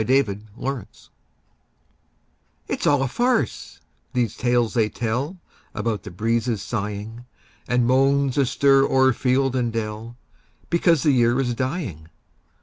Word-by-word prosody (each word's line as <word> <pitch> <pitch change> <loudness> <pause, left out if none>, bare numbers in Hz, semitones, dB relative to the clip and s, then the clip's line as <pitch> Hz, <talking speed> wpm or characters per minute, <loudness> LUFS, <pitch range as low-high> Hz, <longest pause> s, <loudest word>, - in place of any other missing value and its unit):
MERRY 135 +4 +4 0.3
AUTUMN 135 -3 -4 1.8
It's - - -2
all 145 -2 +3
a - - 0
farce, 240 - -1 0.3
these 120 -4 0
tales 120 -2 +1
they 110 -3 +2
tell 125 - -3 0.4
About 110 -3 -2
the 105 - -9
breezes 115 +3 -1
sighing, 110 +2 -5 0.4
And 125 -1 +2
moans 135 +1 +3
astir 135 0 +4
o'er 130 -1 +3
field 130 +2 +1
and 120 -2 0
dell, 115 +1 -5 0.5
Because 170 -3 +3
the 150 - +4
year 120 -1 +3
is 125 -3 0
dying. 130 - -4
125 Hz, 125 wpm, -23 LUFS, 115-135 Hz, 1.8 s, MERRY